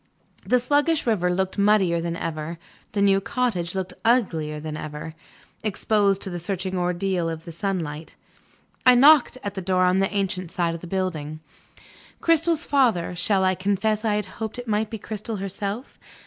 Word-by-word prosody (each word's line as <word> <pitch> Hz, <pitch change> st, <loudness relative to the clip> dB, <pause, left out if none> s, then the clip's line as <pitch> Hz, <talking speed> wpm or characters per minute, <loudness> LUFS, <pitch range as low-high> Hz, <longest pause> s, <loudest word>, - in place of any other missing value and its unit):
The 250 Hz, -, +3 dB
sluggish 290 Hz, +5 st, +1 dB
river 200 Hz, -7 st, +1 dB
looked 190 Hz, +2 st, -1 dB
muddier 195 Hz, -5 st, +3 dB
than 170 Hz, 0 st, -3 dB
ever, 165 Hz, 0 st, -4 dB, 0.4 s
the 200 Hz, -1 st, +1 dB
new 195 Hz, -1 st, +4 dB
cottage 195 Hz, -7 st, -1 dB
looked 185 Hz, -1 st, -3 dB
uglier 165 Hz, -11 st, +1 dB
than 155 Hz, 0 st, -5 dB
ever, 155 Hz, +1 st, -6 dB, 0.5 s
exposed 205 Hz, -1 st, +1 dB
to 190 Hz, -, -3 dB
the 175 Hz, -, -4 dB
searching 185 Hz, +1 st, -3 dB
ordeal 180 Hz, -1 st, 0 dB
of 160 Hz, -1 st, -6 dB
sunlight. 165 Hz, -3 st, -4 dB, 0.7 s
I 250 Hz, -1 st, +7 dB
knocked 280 Hz, 0 st, +6 dB
at 205 Hz, -, -3 dB
the 190 Hz, -, -4 dB
door 185 Hz, 0 st, +1 dB
on 180 Hz, +1 st, +3 dB
the 195 Hz, -, +2 dB
ancient 190 Hz, -3 st, -2 dB
side 170 Hz, -2 st, 0 dB
of 165 Hz, -, -7 dB
the 175 Hz, -, -8 dB
building. 165 Hz, -5 st, -3 dB, 0.8 s
Cristel's 330 Hz, 0 st, +3 dB
father 230 Hz, -12 st, +2 dB
shall 190 Hz, +2 st, +1 dB
I 185 Hz, 0 st, +3 dB
confess 205 Hz, +3 st, 0 dB
I 215 Hz, -2 st, +1 dB
had 210 Hz, -1 st, -1 dB, 0.2 s
hoped 220 Hz, -1 st, -3 dB
that 245 Hz, -, -5 dB
it -, -, -23 dB
might 215 Hz, 0 st, 0 dB
be 225 Hz, -, -5 dB
Cristel 215 Hz, +1 st, -5 dB
herself? 200 Hz, +4 st, -5 dB
190 Hz, 175 wpm, -24 LUFS, 175-215 Hz, 0.8 s, I